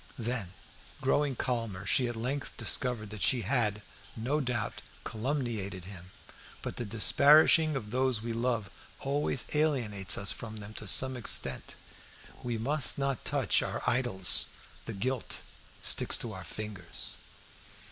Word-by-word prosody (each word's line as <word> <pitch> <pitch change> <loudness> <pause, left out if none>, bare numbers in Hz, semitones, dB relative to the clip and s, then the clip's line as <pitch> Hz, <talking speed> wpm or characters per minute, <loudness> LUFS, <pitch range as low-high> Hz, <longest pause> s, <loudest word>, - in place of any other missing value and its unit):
Then, 115 -6 -3 0.5
growing 135 +1 +1
calmer, 115 -7 -3
she 120 +8 +3
at 120 - -4
length 130 +5 -4
discovered 115 -5 -2
that 105 -2 -7
she 125 +2 +3
had, 105 -2 0 0.3
no 130 +7 -1
doubt, 125 -4 -2 0.2
calumniated 110 - -3
him. 90 -2 -10 0.5
But - - -5
the 120 - -3
disparaging 150 +8 +5
of 105 -6 -5
those 130 -2 +2
we 115 +1 -4
love 115 -4 -1 0.3
always 140 -2 0
alienates 120 -11 +2
us 100 0 -1
from 110 -2 -7
them 105 0 -8
to 105 - -6
some 130 +6 +5
extent. 120 - 0 0.7
We 120 -2 -3
must 140 +5 +1
not 135 -3 -1
touch - - +2
our - - -4
idols; 115 -8 +4 0.4
the 115 - -5
gilt 125 +4 -2 0.5
sticks - - +4
to - - -4
our - - -8
fingers. 105 -5 -7
120 Hz, 135 wpm, -30 LUFS, 105-130 Hz, 0.7 s, disparaging